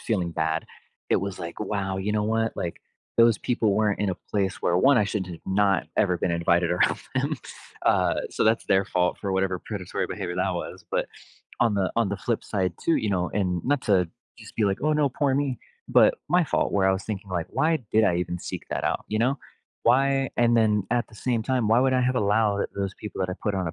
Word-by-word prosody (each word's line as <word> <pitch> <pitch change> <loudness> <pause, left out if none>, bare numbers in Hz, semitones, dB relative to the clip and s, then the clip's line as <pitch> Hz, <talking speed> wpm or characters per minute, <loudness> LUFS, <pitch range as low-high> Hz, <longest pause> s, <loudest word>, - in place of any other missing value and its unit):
feeling 90 -7 -1
bad, 80 0 -1 0.5
it - - +5
was 100 -1 -3
like, 85 0 -7
wow, 100 -3 -2
you 105 +2 -1
know 105 - +1
what, 110 +1 0
like, 85 - -4 0.4
those 115 -3 +6
people 115 -4 +1
weren't 105 -1 +1
in 105 -2 0
a 90 - -2 0.2
place 100 -2 0
where, 85 - +2
1, 135 +5 +5
I 105 - +3
should 100 -2 -2
have 85 - -7
not 95 -4 +2
ever 90 -3 +2
been - - 0
invited 85 0 +2
around 90 - +2 0.2
them. - - 0 0.5
Uh, - - +3
so - - -1
that's 110 +1 +2
their 95 0 +3
fault 90 -1 0
for 100 -1 -3
whatever 95 -1 0
predatory 95 -2 -4
behavior 90 -4 -5
that 90 +1 0
was, 90 +1 -6
but - - 0 0.5
on 115 -2 +3
the 95 -2 0
on 115 -4 +2
the 100 - -2
flip 115 -2 -2
side 95 -4 -1
too, 165 - +3
you 110 - -1
know, 90 -3 0
and 90 -4 -1
not 145 +1 +1
to 95 -5 +3 0.3
just - - -13
be 110 - +1
like, 100 -1 +1
"Oh 155 0 +2
no, 150 -2 +2
poor 135 +1 0
me," 140 -2 -1 0.3
but - - +5
my 175 0 +4
fault - - 0
where 95 -1 +3
I - - +4
was 95 +1 -3
thinking 100 -2 -5
like, 85 -3 -2
"Why 155 +5 +1
did 110 0 +4
I 85 - +2
even 90 0 -2
seek - - -6
that - - -2
out?" - - -1
You 110 - -1
know, 130 +5 +1 0.5
why 135 +2 +3
and 120 0 +3
then 105 -3 +3
at 120 -1 0
the 110 - -17
same 115 +1 -1
time, 125 -2 0
why 115 +2 +5
would 130 0 +3
I 130 - +2
have 125 +1 +1
allowed 105 -1 +2
those 100 -1 -2
people 105 -2 -7
that 90 - -2
I 90 - -3
put 105 -2 0
on 95 -2 -1
a - - -6
105 Hz, 240 wpm, -25 LUFS, 95-115 Hz, 0.5 s, those